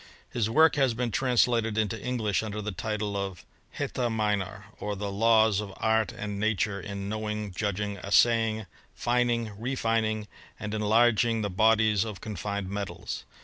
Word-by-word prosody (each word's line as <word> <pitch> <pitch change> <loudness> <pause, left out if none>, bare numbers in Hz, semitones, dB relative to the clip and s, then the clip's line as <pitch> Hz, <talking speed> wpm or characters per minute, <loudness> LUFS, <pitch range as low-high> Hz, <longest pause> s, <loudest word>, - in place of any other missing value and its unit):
His 115 -3 0
work 155 +6 +5
has 135 -5 +3
been 120 0 -1
translated 120 -3 +2
into 110 0 0
English 115 -6 0
under 105 -1 -4
the 105 0 -3
title 105 +1 -3
of 95 -3 -4 0.3
*^ - - -11
Heta: 120 -2 -1
Minor; 105 -2 -1
or 105 0 -3
the 100 0 -4
laws 110 0 +4
of 100 -2 -7
art 110 -1 +2
and 105 -1 -5
nature 105 -1 0
in 100 +1 -5
knowing,. 105 -1 -3
judging, 100 +1 -2
assaying, 110 +3 +3 0.3
fining, 120 -2 +1
refining, 115 -3 0 0.3
and 105 -1 -4
enlarging 115 +1 +3
the 100 - -2
bodies 110 0 +4
of 110 -3 -6
confined 100 -2 -4
metals. 95 -3 -5
110 Hz, 150 wpm, -28 LUFS, 100-115 Hz, 0.3 s, work